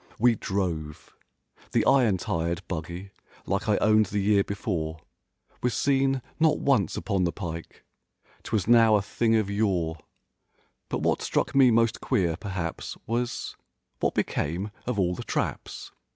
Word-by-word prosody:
We 120 +1 +5
drove. 85 -8 -3 0.6
The - - +3
iron 120 -8 +4
tired 85 -1 -2
buggy 85 +3 -5 0.3
like - - -1
I - - +4
owned 110 -1 +4
the 105 - -3
year 100 0 +3
before. 85 -7 -3 0.6
Was 125 - 0
seen 135 -2 +2 0.2
not 160 -1 +4
once 120 - +1
upon 100 -4 0
the 85 - +1
pike, 85 -3 -7 0.6
'Twas 105 -4 -1
now 115 -2 +6
a 100 - +2
thing 115 +2 +1
of 105 -3 +1
yore— 90 -6 0 0.9
But - - -2
what - - +1
struck - - 0
me 135 -2 +6
most 115 0 +2
queer, 85 -5 +1
perhaps 90 -3 -5
Was—"What 120 +2 -4
became 90 +8 -1 0.2
of 125 -3 -1
all 90 -2 +2
the - - -6
traps?" - - -4
100 Hz, 140 wpm, -27 LUFS, 85-115 Hz, 0.9 s, now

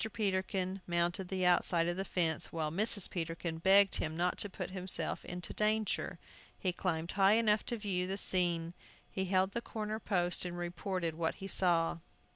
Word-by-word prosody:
Peterkin 190 -2 -1
mounted 175 +2 -1
the 185 0 -1
outside 175 -1 +3
of 175 - -1
the 190 - -2
fence, 170 -4 -1
while 155 -2 -2
Mrs. 200 +2 +2
Peterkin 165 -1 -4
begged 195 +3 +5
him 155 +1 -3
not 180 +1 0
to 205 - +1
put 185 - -6
himself 185 -1 +2
in 180 0 -6
danger. 215 +4 -1 0.4
He 185 -2 -1
climbed 170 -2 -2
high 195 +1 +4
enough 215 -1 +3
to 235 - -1
view 190 -4 -1
the 195 +1 -3
scene. 175 -3 +2 0.4
He 190 - -2
held 190 +1 +1
to 235 - -2
the - - -12
corner 215 -1 -5
post 180 -5 +1
and 175 -1 -5
reported 175 0 -3
what 160 0 -2
he 195 - -9
saw. 170 -3 +2
185 Hz, 180 wpm, -33 LUFS, 175-195 Hz, 0.4 s, begged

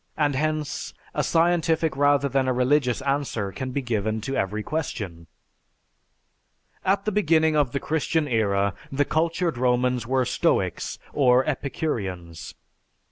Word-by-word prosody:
And 145 -2 +2
hence, 155 +1 -2 0.2
a - - 0
scientific 165 -2 +2
rather 145 0 +3
than 135 -1 +1
a 130 - +2
religious 125 0 +1
answer 135 -8 -1
can 130 +8 -5
be 135 +2 -3
given 110 -2 -1
to 135 +5 -3
every 105 +3 -1
question." 100 - -4 1.6
At 195 +1 +1
the 215 - +1
beginning 160 -6 +3
of 145 -5 +2
the 140 - -1
Christian 160 0 0
era, 100 -5 +1 0.2
the 145 +1 +1
cultured 165 -2 0
Romans 125 -1 +1
were 130 0 +2
stoics - - 0 0.2
or 130 -2 +4
epicureans. 95 - -4
135 Hz, 135 wpm, -25 LUFS, 115-155 Hz, 1.6 s, or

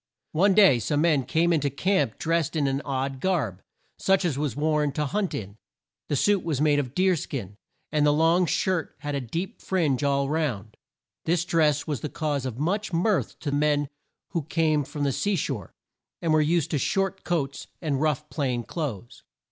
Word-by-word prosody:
One 190 +4 +3
day 195 - +6
some 145 +5 0
men 155 -6 +3
came 170 +1 +2
in 160 - +3
to 140 - +1
camp 185 - 0
drest 165 0 0
in 150 -3 +1
an 135 0 0
odd 135 -1 -2
garb, 140 - 0 0.4
such 195 -1 +2
as 160 -6 0
was 140 -4 -2
worn 150 -1 +1
to 150 +1 -1
hunt 195 +5 -1
in. 100 0 -6 0.5
The 145 - +1
suit 205 +6 +2
was 155 -5 -1
made 150 -1 +3
of 130 -2 -4
deer 185 0 +3
skin, 115 - -5 0.4
and 150 -1 +2
the 150 - +5
long 165 +4 +3
shirt 180 0 0
had 145 0 -3
a 140 - -1
deep 165 - -5
fringe 150 -9 0
all 140 -1 +2
round. 130 -9 -2 0.5
This 170 +1 +1
dress 150 -4 +2
was 150 -4 -3
the 150 - -3
cause 145 -4 -2
of 120 -2 -6
much 195 +8 -1
mirth 180 +3 0
to 145 - -2
men 145 0 +1 0.4
who 170 - -1
came 155 0 +1
from 145 +1 -4
the 140 - +2
sea 200 +9 0
shore, 130 - -3 0.5
and 165 -2 +1
were 155 - +5
used 160 0 +1
to 150 - +1
short 195 +5 -1
coats, 145 -6 -2
and 145 -5 -1
rough 150 -1 0
plain 125 -5 -1
clothes. 120 - -5
150 Hz, 195 wpm, -26 LUFS, 140-170 Hz, 0.5 s, day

